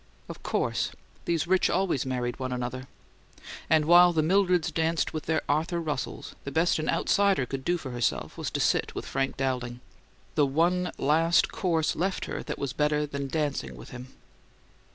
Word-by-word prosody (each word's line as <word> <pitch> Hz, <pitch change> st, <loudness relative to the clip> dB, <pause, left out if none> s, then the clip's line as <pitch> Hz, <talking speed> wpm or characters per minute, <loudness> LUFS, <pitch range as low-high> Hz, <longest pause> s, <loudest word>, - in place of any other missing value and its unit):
Of -, -, -9 dB
course! -, -, -1 dB, 0.4 s
These 165 Hz, -3 st, 0 dB
rich 185 Hz, +1 st, +3 dB
always 175 Hz, -8 st, 0 dB
married 125 Hz, -1 st, -2 dB
one 130 Hz, -1 st, -3 dB
another. 125 Hz, +1 st, -4 dB, 0.8 s
And 155 Hz, -1 st, +4 dB
while 175 Hz, +2 st, +7 dB
the 155 Hz, -2 st, +2 dB
Mildreds 180 Hz, -1 st, +2 dB
danced 165 Hz, 0 st, 0 dB
with 155 Hz, -, -5 dB
their 160 Hz, -1 st, +1 dB
Arthur 160 Hz, +4 st, 0 dB
Russells 150 Hz, -5 st, -4 dB
the -, -, -5 dB
best 160 Hz, +4 st, +2 dB
an 155 Hz, -, -2 dB
outsider 200 Hz, -9 st, +2 dB
could 135 Hz, +1 st, -5 dB
do 175 Hz, +5 st, +1 dB
for 140 Hz, -6 st, -7 dB
herself 120 Hz, -1 st, -1 dB
was -, -, -3 dB
to -, -, -3 dB
sit -, -, +1 dB
with -, -, -4 dB
Frank 135 Hz, 0 st, -2 dB
Dowling 125 Hz, -2 st, -2 dB, 0.5 s
the 145 Hz, -2 st, +3 dB
one 175 Hz, +5 st, +1 dB
last 165 Hz, +4 st, +3 dB
course 165 Hz, -4 st, 0 dB
left 190 Hz, +4 st, -1 dB
her -, -, -4 dB
that -, -, -5 dB
was 140 Hz, -3 st, -3 dB
better 150 Hz, 0 st, +1 dB
than 140 Hz, -1 st, -4 dB
dancing 140 Hz, -, -2 dB
with -, -, -12 dB
him. 125 Hz, +1 st, -8 dB
150 Hz, 175 wpm, -27 LUFS, 130-170 Hz, 0.8 s, while